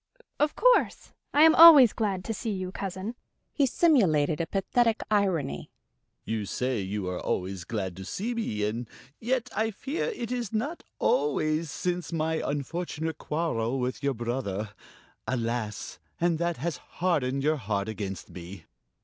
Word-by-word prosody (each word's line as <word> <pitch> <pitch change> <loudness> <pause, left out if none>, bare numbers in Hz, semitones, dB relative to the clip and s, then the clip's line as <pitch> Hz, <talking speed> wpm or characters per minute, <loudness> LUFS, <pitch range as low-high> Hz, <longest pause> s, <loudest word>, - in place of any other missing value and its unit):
of 295 +1 +2
course, - - +2 0.2
I 295 - +5
am 320 0 +8
always 310 -9 +10
glad 195 -4 -2
to 225 - -2
see 225 - -4
you, 185 -3 -3
cousin." 195 +3 -5 0.4
He 280 -3 +3
simulated 175 - +3
a 165 - -2
pathetic 225 +3 +1
irony. 190 -9 0 0.6
"You 110 -2 -2
say 125 0 -1
you 95 0 -3
are 90 -1 -3
always 95 -1 -3
glad 95 -5 -3
to 95 - -7
see 220 - -3
me 110 - -2
and 115 +2 -4 0.3
yet, 250 0 -1
I 220 +2 +1
fear 265 +8 -3
it 250 - -4
is 240 -5 -2
not 280 +11 -2 0.2
always 155 +2 +1
since 180 +4 -3
my 160 -1 0
unfortunate 160 +2 -3
quarrel 135 -6 -1
with 125 0 -2
your 140 -2 0
brother. 110 -4 -3 0.6
Alas, 115 -4 -3 0.2
and 170 -2 +1
that 170 -1 -1
has 165 +5 -3
hardened 140 -7 -1
your 155 +1 +2
heart 100 -4 -2
against 100 -3 -5
me." 90 -1 -10
160 Hz, 150 wpm, -28 LUFS, -, 0.6 s, always